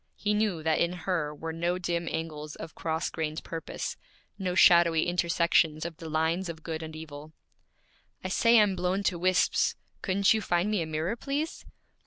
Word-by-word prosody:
He 210 Hz, 0 st, -1 dB
knew 210 Hz, -6 st, 0 dB
that 160 Hz, 0 st, +2 dB
in 170 Hz, +1 st, +1 dB
her 170 Hz, -4 st, -2 dB
were 160 Hz, +2 st, -6 dB
no 170 Hz, +2 st, -1 dB
dim 170 Hz, -1 st, -2 dB
angles 155 Hz, -2 st, -5 dB
of 160 Hz, -, -8 dB
cross 160 Hz, +1 st, -2 dB
grained 155 Hz, -1 st, -3 dB
purpose, 165 Hz, -1 st, -5 dB, 0.4 s
no 180 Hz, -2 st, -2 dB
shadowy 170 Hz, -3 st, +6 dB
intersections 170 Hz, -2 st, +2 dB
of 165 Hz, -2 st, -6 dB
the 165 Hz, -, -8 dB
lines 160 Hz, +4 st, 0 dB
of 160 Hz, -1 st, -8 dB
good 160 Hz, -1 st, -4 dB
and 160 Hz, -1 st, -7 dB
evil. 155 Hz, -1 st, -9 dB, 0.9 s
'I 185 Hz, -, -3 dB
say 230 Hz, +4 st, +5 dB
I'm 205 Hz, -3 st, +3 dB
blown 185 Hz, +2 st, -1 dB
to 180 Hz, -4 st, 0 dB
wisps; 185 Hz, +1 st, +2 dB, 0.3 s
couldn't 195 Hz, +1 st, +3 dB
you 220 Hz, -, 0 dB
find 175 Hz, +2 st, 0 dB
me 210 Hz, -4 st, +1 dB
a 160 Hz, -, -3 dB
mirror, 160 Hz, +7 st, -2 dB
please?' 285 Hz, +6 st, -4 dB
170 Hz, 180 wpm, -28 LUFS, 160-185 Hz, 0.9 s, shadowy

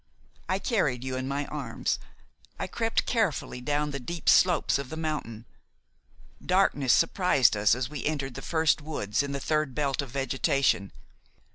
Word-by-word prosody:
I 185 Hz, -, +2 dB
carried 165 Hz, -, 0 dB
you 130 Hz, 0 st, -3 dB
in 130 Hz, 0 st, -3 dB
my 140 Hz, +1 st, -2 dB
arms. -, -, -3 dB, 0.6 s
I -, -, -3 dB
crept 225 Hz, -1 st, -1 dB
carefully 195 Hz, -, -1 dB
down 145 Hz, +3 st, -1 dB
the 140 Hz, -, -4 dB
deep 170 Hz, +6 st, -2 dB
slopes 175 Hz, -6 st, +4 dB
of 140 Hz, -2 st, -6 dB
the 160 Hz, -, -6 dB
mountain. 150 Hz, -8 st, -4 dB, 1.0 s
Darkness 180 Hz, -8 st, +2 dB
surprised 160 Hz, -, +3 dB
us 105 Hz, +2 st, +3 dB
as 125 Hz, 0 st, -2 dB
we 145 Hz, -3 st, -6 dB
entered 140 Hz, -4 st, -2 dB
the 135 Hz, -, -7 dB
first 160 Hz, 0 st, +1 dB
woods, 145 Hz, -9 st, -2 dB
in 140 Hz, 0 st, -4 dB
the 140 Hz, -, -3 dB
third 150 Hz, -2 st, -1 dB
belt 140 Hz, -2 st, 0 dB
of 140 Hz, -, -7 dB
vegetation. 135 Hz, -5 st, 0 dB
140 Hz, 160 wpm, -27 LUFS, 130-160 Hz, 1.0 s, slopes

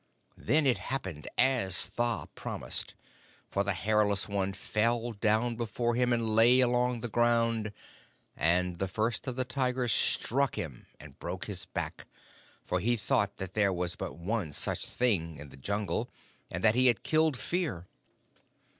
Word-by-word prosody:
Then 150 Hz, +6 st, +2 dB
it 130 Hz, -3 st, +3 dB
happened 95 Hz, -, -4 dB
as 120 Hz, -9 st, +4 dB
Tha 120 Hz, -1 st, -2 dB
promised, -, -, -3 dB, 0.6 s
for 100 Hz, -, +1 dB
the 100 Hz, 0 st, +3 dB
Hairless 105 Hz, +1 st, +1 dB
One 100 Hz, -1 st, -1 dB
fell 115 Hz, +4 st, 0 dB
down 110 Hz, +2 st, +1 dB
before 120 Hz, +1 st, -1 dB
him 125 Hz, +1 st, +1 dB
and 115 Hz, -2 st, 0 dB
lay 120 Hz, +3 st, +6 dB
along 125 Hz, -1 st, +2 dB
the 120 Hz, -, -2 dB
ground, 115 Hz, -1 st, +1 dB, 0.6 s
and 90 Hz, +2 st, +1 dB
the 95 Hz, -, 0 dB
First 110 Hz, +7 st, -2 dB
of 130 Hz, -, -2 dB
the 130 Hz, 0 st, -1 dB
Tigers 125 Hz, -2 st, 0 dB
struck 135 Hz, +5 st, +2 dB
him 70 Hz, -7 st, -6 dB
and 75 Hz, -3 st, -14 dB
broke -, -, -4 dB
his -, -, -3 dB
back, -, -, -5 dB, 0.6 s
for 90 Hz, -, 0 dB
he 120 Hz, +6 st, +1 dB
thought 100 Hz, -1 st, 0 dB
that 95 Hz, -1 st, -6 dB
there 100 Hz, -2 st, +2 dB
was 90 Hz, -1 st, -2 dB
but -, -, -6 dB
one 90 Hz, -3 st, -2 dB
such -, -, -1 dB
Thing 85 Hz, -10 st, 0 dB
in 75 Hz, 0 st, -10 dB
the -, -, -13 dB
Jungle, 100 Hz, +9 st, -2 dB, 0.4 s
and 90 Hz, +2 st, -5 dB
that 110 Hz, -, +5 dB
he 130 Hz, +2 st, +4 dB
had 120 Hz, -3 st, +3 dB
killed 155 Hz, -3 st, +2 dB
Fear. 160 Hz, -, -2 dB
110 Hz, 160 wpm, -30 LUFS, 95-120 Hz, 0.6 s, lay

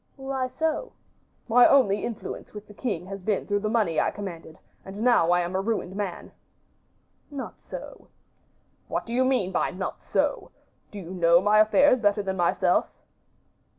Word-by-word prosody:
"Why 270 Hz, -1 st, -3 dB
so?" 320 Hz, -, -2 dB, 0.5 s
"My 245 Hz, +1 st, +6 dB
only 210 Hz, -8 st, +3 dB
influence 225 Hz, -2 st, -6 dB
with 210 Hz, 0 st, -8 dB
the 210 Hz, -, -14 dB
king 200 Hz, -7 st, -3 dB
has 195 Hz, +1 st, -7 dB
been 205 Hz, +1 st, -1 dB
through 205 Hz, -1 st, 0 dB
the 215 Hz, +1 st, -2 dB
money 210 Hz, -9 st, +1 dB
I -, -, +2 dB
commanded, 170 Hz, -6 st, -8 dB, 0.3 s
and 200 Hz, +3 st, -7 dB
now 240 Hz, -9 st, +4 dB
I 175 Hz, 0 st, +3 dB
am 175 Hz, +2 st, -4 dB
a 190 Hz, -, +1 dB
ruined 200 Hz, -3 st, -3 dB
man." 200 Hz, -4 st, -5 dB, 1.0 s
"Not 280 Hz, -3 st, -8 dB
so." -, -, -10 dB, 0.8 s
"What -, -, -3 dB
do 230 Hz, -, -6 dB
you 255 Hz, +2 st, +3 dB
mean 255 Hz, -8 st, +1 dB
by -, -, 0 dB
'not 190 Hz, +1 st, -5 dB
so?' -, -, -1 dB, 0.4 s
Do 210 Hz, -, -10 dB
you 180 Hz, -3 st, -8 dB
know 170 Hz, -2 st, +4 dB
my 210 Hz, +3 st, +3 dB
affairs 250 Hz, +5 st, +5 dB
better 205 Hz, -1 st, +1 dB
than 190 Hz, -1 st, -2 dB
myself?" 175 Hz, -1 st, +2 dB
205 Hz, 170 wpm, -26 LUFS, 185-245 Hz, 1.0 s, My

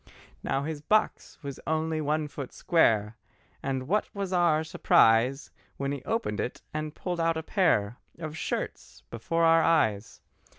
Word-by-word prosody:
Now 135 Hz, -, -1 dB
his 155 Hz, 0 st, -4 dB
box 215 Hz, +8 st, 0 dB
was 140 Hz, -1 st, -6 dB
only 160 Hz, 0 st, 0 dB
one 150 Hz, +1 st, 0 dB
foot 140 Hz, -2 st, -7 dB
square, 110 Hz, -, +2 dB, 0.4 s
And 130 Hz, -1 st, -3 dB
what 205 Hz, +5 st, 0 dB
was 195 Hz, -2 st, -3 dB
our 170 Hz, -3 st, +3 dB
surprise 125 Hz, -3 st, +3 dB, 0.3 s
When 140 Hz, 0 st, -2 dB
he 140 Hz, -2 st, -4 dB
opened 225 Hz, -, -2 dB
it 125 Hz, -, -4 dB
and 155 Hz, 0 st, -4 dB
pulled 175 Hz, -2 st, -4 dB
out 165 Hz, 0 st, +1 dB
a 160 Hz, -, -4 dB
pair 125 Hz, -, +1 dB, 0.2 s
Of 155 Hz, -2 st, -6 dB
shirts -, -, -5 dB
before 145 Hz, +9 st, -1 dB
our 165 Hz, 0 st, +6 dB
eyes! 115 Hz, -11 st, +1 dB
155 Hz, 155 wpm, -28 LUFS, 130-165 Hz, 0.4 s, our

